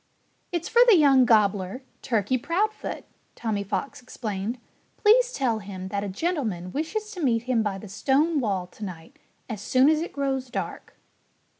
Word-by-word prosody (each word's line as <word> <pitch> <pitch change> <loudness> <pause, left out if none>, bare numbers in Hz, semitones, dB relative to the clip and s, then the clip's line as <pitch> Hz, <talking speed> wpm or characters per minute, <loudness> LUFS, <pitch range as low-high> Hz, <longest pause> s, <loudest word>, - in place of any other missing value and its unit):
"It's 340 -1 -2
for 475 - +4
the 415 - +8
young 275 -4 +6
gobbler, 210 0 +2 0.2
Turkey 230 0 0
Proudfoot," 410 - -2 0.3
Tommy 215 -3 -2
Fox 200 +8 -4
explained. 220 -2 -4 0.4
"Please - - +5
tell 245 - 0
him 190 -2 -7
that 200 0 -2
a 205 - -3
gentleman 210 - -2
wishes 425 - -3
to 370 -5 -7
meet 235 -5 +2
him 245 -2 +1
by 205 -3 -2
the 210 - -10
stone 285 - +1
wall 195 -7 -1
to 180 +4 -12
night, 170 -5 -9 0.3
as 220 -4 -5
soon 260 +6 +4
as 310 0 +2
it 340 - -4
grows 270 -2 -2
dark." - - -5
245 Hz, 165 wpm, -25 LUFS, 200-305 Hz, 0.4 s, the